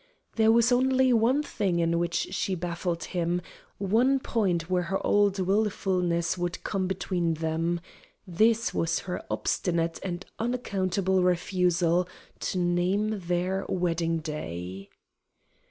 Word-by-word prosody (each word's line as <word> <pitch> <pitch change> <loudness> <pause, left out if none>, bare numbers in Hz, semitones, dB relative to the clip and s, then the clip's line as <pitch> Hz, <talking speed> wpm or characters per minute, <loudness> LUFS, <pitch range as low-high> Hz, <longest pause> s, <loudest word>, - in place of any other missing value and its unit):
There 220 -1 +5
was 235 +1 +4
only 260 +1 +3
one 245 +6 +3
thing 195 -10 -1
in 170 0 +1
which 170 +2 -1
she 190 0 -1
baffled 170 0 -3
him, 175 -1 -1 0.4
one 235 +8 +2
point 185 -10 0
where 180 0 +1
her 190 +2 -2
old 205 -1 +3
wilfulness 185 -3 0
would 175 0 -3
come 190 -2 -1
between 180 -3 -1
them. 165 +2 -1 0.5
This 220 +5 +2
was 165 0 0
her 180 -1 -5
obstinate 170 -2 -1
and 180 0 -4
unaccountable 195 -6 0
refusal 180 -1 +2 0.3
to - - -2
name 185 +4 +1
their 180 +2 0
wedding 165 -2 0
day. 95 - -6
180 Hz, 120 wpm, -27 LUFS, 170-205 Hz, 0.5 s, There